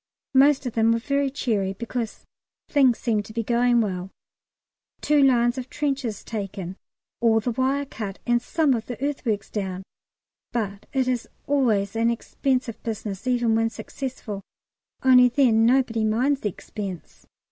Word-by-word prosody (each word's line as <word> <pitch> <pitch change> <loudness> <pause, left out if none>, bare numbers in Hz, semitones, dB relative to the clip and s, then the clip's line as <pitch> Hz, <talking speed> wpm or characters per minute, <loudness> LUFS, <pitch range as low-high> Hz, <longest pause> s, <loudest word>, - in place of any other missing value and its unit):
Most 275 +1 +5
of 245 - -3
them 225 0 +3
were 230 - +3
very 280 +3 0
cheery, 215 -8 -1
because 230 +2 -5 0.4
things 265 -5 +4
seem 225 -4 0
to 205 - -12
be 230 0 -1
going 240 +1 +3
well. 185 -3 -3 0.9
Two 295 -1 +3
lines 245 -2 +3
of 255 0 -7
trenches 270 -7 -2
taken, 195 -4 -5 0.4
all 225 -1 +4
the 240 +3 -2
wire 265 +4 0
cut, 210 -7 -6
and 240 -1 +2
some 305 +2 +2
of 225 -2 -3
the 245 - -6
earthworks 225 -8 -2
down; 190 -3 -3 0.7
but 205 -4 -3
it 265 -3 +1
is 250 -2 -1 0.2
always 225 -8 +1
an 230 +1 +2
expensive 250 +1 -1
business 215 -1 -5
even 240 -2 +2
when 225 0 +2
successful 225 -2 -6 0.6
only 250 -1 +7
then 235 -3 +4
nobody 240 -3 +2
minds 250 +6 +2
the 210 - 0
expense. 195 -2 -8
235 Hz, 150 wpm, -24 LUFS, 215-260 Hz, 0.9 s, only